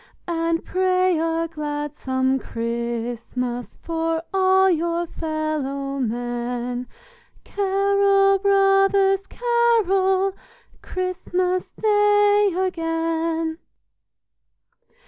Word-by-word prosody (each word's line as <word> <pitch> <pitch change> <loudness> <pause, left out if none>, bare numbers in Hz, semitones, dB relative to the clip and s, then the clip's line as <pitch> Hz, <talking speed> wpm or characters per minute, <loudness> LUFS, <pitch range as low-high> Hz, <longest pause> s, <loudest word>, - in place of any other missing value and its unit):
And 330 -1 -1
pray 370 -2 +1
a 330 0 0
gladsome 290 -4 -2
Christmas 235 +1 -4
For 330 0 -2
all 380 0 +4
your 340 -1 0
fellow 305 -4 -3
men; 245 +1 -3 0.6
Carol, 395 0 +2
brothers, 390 0 +3
carol, 390 -6 +2 0.5
Christmas 365 0 -2
Day 415 -1 +4
again." 330 -2 -1
335 Hz, 65 wpm, -22 LUFS, 290-390 Hz, 0.6 s, all